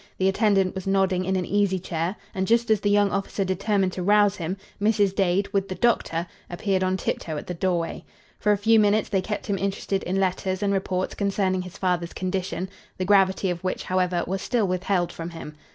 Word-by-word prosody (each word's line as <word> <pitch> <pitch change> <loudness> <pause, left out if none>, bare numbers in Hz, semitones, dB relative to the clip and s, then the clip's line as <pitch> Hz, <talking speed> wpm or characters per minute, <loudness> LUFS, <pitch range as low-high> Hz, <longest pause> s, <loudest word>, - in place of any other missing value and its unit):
The 190 - +2
attendant 195 -1 +2
was 190 0 -6
nodding 190 -1 +2
in 190 +1 0
an 185 -1 0
easy 200 -2 +1
chair; 170 +1 -3 0.2
and, 190 0 -1
just 230 0 +3
as 215 - +4
the 205 - 0
young 205 -1 +3
officer 195 0 -1
determined 195 0 +1
to 185 - -4
rouse 205 +1 +4
him, 175 +3 -3 0.2
Mrs. 205 -2 +3
Dade, 195 0 +1
with 195 -1 0
the 185 - -3
doctor, 175 -8 +1 0.2
appeared 190 +1 0
on 185 0 +1
tiptoe 160 -3 -3
at - - -6
the 180 - -4
doorway. 175 -1 -1 0.4
For 210 - +2
a 205 - +3
few 220 +2 +4
minutes 210 0 +3
they 195 -2 +1
kept 210 +3 -4
him 195 -2 -1
interested 195 0 -1
in 190 +2 -1
letters 185 0 -1
and 200 0 +2
reports 185 -1 -1
concerning 195 -2 0
his 180 -1 -9
father's 175 -2 -1
condition, 185 0 -3 0.3
the 185 - -2
gravity 190 -1 +3
of 175 0 -5
which, 185 - -2
however, 180 -1 0
was 190 +1 -3
still 230 +1 +1
withheld 180 -1 0
from 165 0 -6
him. 165 -2 -8
190 Hz, 210 wpm, -25 LUFS, 185-200 Hz, 0.4 s, as